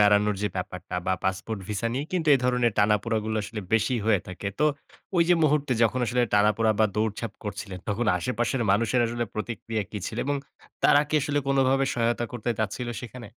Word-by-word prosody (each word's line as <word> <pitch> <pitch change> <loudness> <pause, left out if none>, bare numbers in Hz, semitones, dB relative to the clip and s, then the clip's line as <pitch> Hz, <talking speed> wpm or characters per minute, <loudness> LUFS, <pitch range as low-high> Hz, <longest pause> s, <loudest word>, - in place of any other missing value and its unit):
বেড়ানোর 105 0 +4
যে 105 - +1
ব্যাপারটা 90 0 -5
বা 95 - +2
পাসপোর্ট 95 +3 -2
ভিসা 105 +2 -2
নিয়ে 135 +3 -2
কিন্তু 165 -4 0
এ - - +6
ধরনের 125 -2 +2
টানাপোড়াগুলো 110 +1 +1
আসলে 105 +1 -5
বেশি 115 +3 +3
হয়ে 105 -5 +4
থাকে। 95 +2 -4
তো 150 - +3 0.5
ওই 170 - +6
যে 175 - +6
মুহূর্তে 145 -3 +2
যখন 120 +3 +2
আসলে 125 +3 +1
টানাপোড়া 105 +2 +3
বা 110 - +6
দৌড়ঝাপ 110 0 -1
করছিলেন, 100 -2 -5
তখন 110 +3 0
আশেপাশের 120 +4 -1
মানুষের 115 +5 +2
আসলে 120 +1 -2
প্রতিক্রিয়া 110 0 -3
কি 105 - -4
ছিল 110 - -5
এবং 145 0 +1 0.5
তারা 145 - +6
কি 155 - -3
আসলে 145 0 0
কোনভাবে 135 0 +3
সহায়তা 120 0 +1
করতে 120 0 -2
চাচ্ছিল 110 +3 -2
সেখানে? 120 -2 -9
115 Hz, 185 wpm, -26 LUFS, 105-125 Hz, 0.5 s, এ